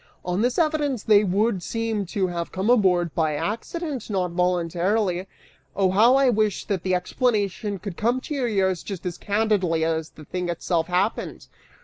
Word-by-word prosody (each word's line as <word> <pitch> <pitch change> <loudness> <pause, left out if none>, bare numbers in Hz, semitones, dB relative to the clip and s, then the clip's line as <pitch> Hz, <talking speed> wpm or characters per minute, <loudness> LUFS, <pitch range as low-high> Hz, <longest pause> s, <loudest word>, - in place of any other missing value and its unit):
On 180 +2 0
this 245 +1 +1
evidence, 300 - +1
they 210 -1 +5
would 200 +1 +1
seem 225 -1 -2
to 195 +1 0
have 170 -2 -4
come 195 +5 0
aboard 180 -8 +3
by 155 -2 0
accident, 260 - -4
not 185 -4 -1
voluntarily. 180 +2 0 0.5
Oh 190 -2 +2
how 225 +7 +5
I 275 0 +4
wish 215 -3 0
that 195 -4 -1
the 185 +1 +1
explanation 205 0 -1
could 195 -2 -7
come 235 +4 +1
to 300 - -6
your 265 -4 0
ears 190 -4 +1
just 190 -4 -7
as 180 -1 -4
candidly 200 -6 +1
as 160 -1 -1
the 155 - -14
thing 180 +1 -3
itself 170 -1 -1
happened! 185 +4 -1
195 Hz, 170 wpm, -24 LUFS, 180-225 Hz, 0.5 s, they